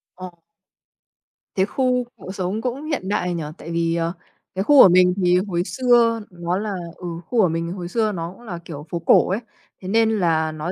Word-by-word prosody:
Ồ. 180 -1 -10 1.2
Thế 190 - +3
khu 250 +2 0
cậu 185 - -8
sống 190 +2 -3
cũng 255 +4 -3
hiện 275 -12 -3
đại 180 -3 0
nhỉ? 170 -2 -3
Tại 165 - -9
vì, 165 0 0
ờ, 165 +1 -1 0.4
cái 190 - 0
khu 285 +2 +7
của 190 - +8
mình 180 0 +5
thì 180 -1 +3
hồi 175 -2 -1
xưa 235 -2 +3
nó 175 0 -3
là 205 0 -3 0.2
ừ, 180 - -7 0.2
khu 240 - -1
của 185 - +4
mình 165 +1 -2
hồi 180 -2 -5
xưa 220 +3 0
nó 170 -3 -5
cũng 215 - -18
là 180 -8 -7
kiểu 150 -2 -8
phố 170 - -3
cổ 165 - +4
ấy, 195 - 0 0.4
thế 185 - -8
nên 225 +3 +3
là 160 -3 +1
nó 155 +3 -4
185 Hz, 215 wpm, -22 LUFS, 170-220 Hz, 1.2 s, của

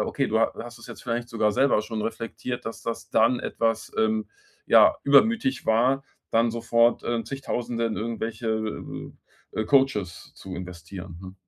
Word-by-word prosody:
okay, 135 - 0
du 110 +1 +1
ha - - +3
hast 120 0 -9
es 115 - -12
jetzt 115 - -10
vielleicht 120 0 -2
sogar 110 -3 +1
selber 135 0 +3
schon 110 0 -4
reflektiert, 115 +2 -4
dass 115 0 -6
das 115 0 -5
dann 115 +3 +4
etwas, 115 -1 -1
ähm, 220 0 +1 0.4
ja, - - +6
übermütig 225 - +3
war, 125 +5 +3 0.3
dann 115 +1 +3
sofort, 115 +1 +2
äh, 120 -1 0
Zigtausende 120 -3 -3
in 115 -1 -1
irgendwelche, 115 0 -3 1.0
äh, - - -2
äh, - - 0
Coaches 130 -10 +1
zu 95 -1 -8
investieren, 90 0 -8
ne? 95 0 -9
115 Hz, 160 wpm, -26 LUFS, 110-125 Hz, 1.0 s, ja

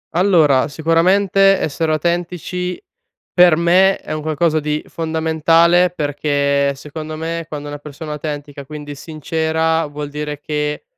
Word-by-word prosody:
Allora, 165 -8 +4
sicuramente 185 +5 +3
essere 160 +2 -1
autentici, 175 +2 -2 0.5
per 175 -3 +6
me 185 +3 +4
è - - -10
un 155 - -3
qualcosa 155 +1 +1
di 150 0 -2
fondamentale, 165 +2 +2
perché 145 -3 0
secondo 155 +2 -7
me, 165 +1 -4
quando 145 -1 -6
una 145 0 -6
persona 150 +1 -8
autentica, 145 -1 -6
quindi 145 +1 -8
sincera, 160 +2 -1
vuol 145 0 -6
dire 150 0 -5
che 150 0 -3
155 Hz, 125 wpm, -18 LUFS, 150-170 Hz, 0.5 s, per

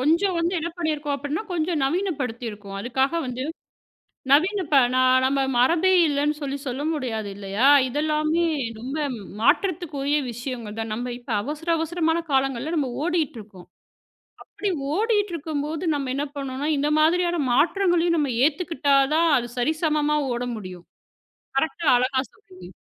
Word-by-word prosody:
கொஞ்சம் 340 +7 +2
வந்து 335 +2 0
என்ன 330 - -3
பண்ணி 325 -2 0
இருக்கோம் 295 -1 -3
அப்படின்னா, 290 +7 -3
கொஞ்சம் 335 -1 0
நவீனப்படுத்தி 275 - -2
இருக்கோம். 205 -2 -10
அதுக்காக 265 +6 0
வந்து 250 0 -4 0.9
நவீன 360 +9 +4
இப்ப 290 -2 +4
நா 255 - +3 0.2
நம்ம 275 +1 +2 0.2
மரபே 335 +9 +4 0.2
இல்லையென்று 295 +1 0
சொல்லி 280 -1 -3
சொல்ல 260 +1 -3
முடியாது 225 -8 -3
இல்லையா? 200 +5 0 0.2
இதெல்லாமே 305 +4 0 0.4
ரொம்ப 265 +6 -5 0.4
மாற்றத்திற்குரிய 300 - +1
விஷயங்கள் 235 -3 -6
தான், 225 -1 -3
நாம் 245 +3 -3
இப்போ 240 -2 -5
அவசர, 300 +5 -6
அவசரமான 325 0 0
காலங்களில் 270 +3 0
நம்ம 285 -5 0
ஓடிட்டு 325 -7 -1
இருக்கோம். 200 -4 -13 0.8
அப்படி 410 - -5 0.3
ஓடிக்கிட்டு 420 -3 +1
இருக்கும்போது 310 +1 -3
நாம் 270 -3 -2
என்ன 280 +2 -1
பண்ணணும்னா 275 +1 -3
இந்த 290 +2 +1
மாதிரியான 345 +2 +2
மாற்றங்களையும் 345 +4 +2
நாம் 280 -7 0
ஏற்றுக்கொண்டாள் 285 -4 +2
தான் 335 +1 +3
அது 240 0 -4
சரி 305 +6 +1
சமமாக 300 -2 +1
ஓட 245 +1 -2
முடியும். 185 -4 -9 0.7
கரெக்ட் 315 +4 -1
ஆக - - +6
அழகா 260 +1 +1
சொன்னீங்க! 185 -1 -15
290 Hz, 145 wpm, -24 LUFS, 255-325 Hz, 0.9 s, ஆக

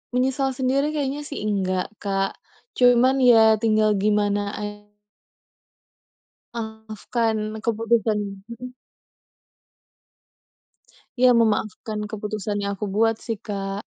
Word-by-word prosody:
Menyesal 265 +1 0
sendiri 270 +3 +1
kayaknya 285 0 -2
sih 285 - -6
enggak, 185 -3 -1
Kak. 195 -1 -1 0.5
Cuman 250 +2 +5
ya 225 -4 +6
tinggal 215 -1 +3
gimana 205 0 +1
a - - -5 1.9
memaafkan 220 0 -3 0.3
keputusan 225 -1 +1 0.3
mhm. 240 +2 -8 2.4
Iya, 255 0 +5
memaafkan 215 0 -1
keputusan 210 -1 -4
yang 200 0 -2
aku 210 - -4
buat 225 +1 +3
sih, 225 -3 -3
Kak. 195 -1 -4
220 Hz, 95 wpm, -23 LUFS, 210-245 Hz, 2.4 s, ya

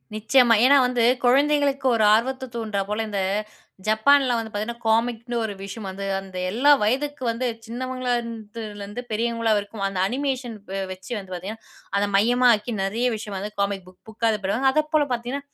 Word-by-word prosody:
நிச்சயமா. 235 +3 +4
ஏன்னா 280 +2 +7
வந்து 250 -2 0 0.2
குழந்தைகளுக்கு 280 +1 +3
ஒரு 220 - +2
ஆர்வத்தை 260 +4 0
தூண்ட்றா 220 -4 -2
போல, 210 +2 -1
இந்த 205 -1 -2 0.7
ஜப்பான்ல 255 +4 +4
வந்து 225 -1 -4
பார்த்தீங்கன்னா 220 +3 -4
காமிக்னு 230 +1 0
ஒரு 220 -2 -3
விஷயம் 195 +1 -7
வந்து, 195 +1 -6 0.2
அந்த 190 -1 -10
எல்லா 260 +8 +4
வயதுக்கு 270 +5 -1
வந்து 235 +3 -3 0.2
சின்னவங்களா 255 +1 -3
இருந்துலருந்து 215 -1 -7
பெரியவங்களா 230 +1 0
வரைக்கு, 200 0 -4
அந்த 195 -2 -4
அனிமேஷன் 255 -1 -2 0.4
வச்சு 190 +4 -13
வந்து 190 -2 -9
பார்த்தீங்கனா 195 +5 -7 0.3
அத 205 +1 +1
மையமா 245 +5 +4
ஆக்கி 210 +3 -6
நெறைய 220 +6 -1
விஷயம் 210 -2 -6
வந்து 205 +2 -5
காமிக் 200 -2 -1
புக் 185 0 -18
புக் 225 +1 -1
இது 215 - -2
பண்ணுவாங்க. 250 +8 +2
அதப்போல 305 0 +2
பார்த்தீங்கன்னா, 245 +4 -4
230 Hz, 160 wpm, -24 LUFS, 205-255 Hz, 0.7 s, ஏன்னா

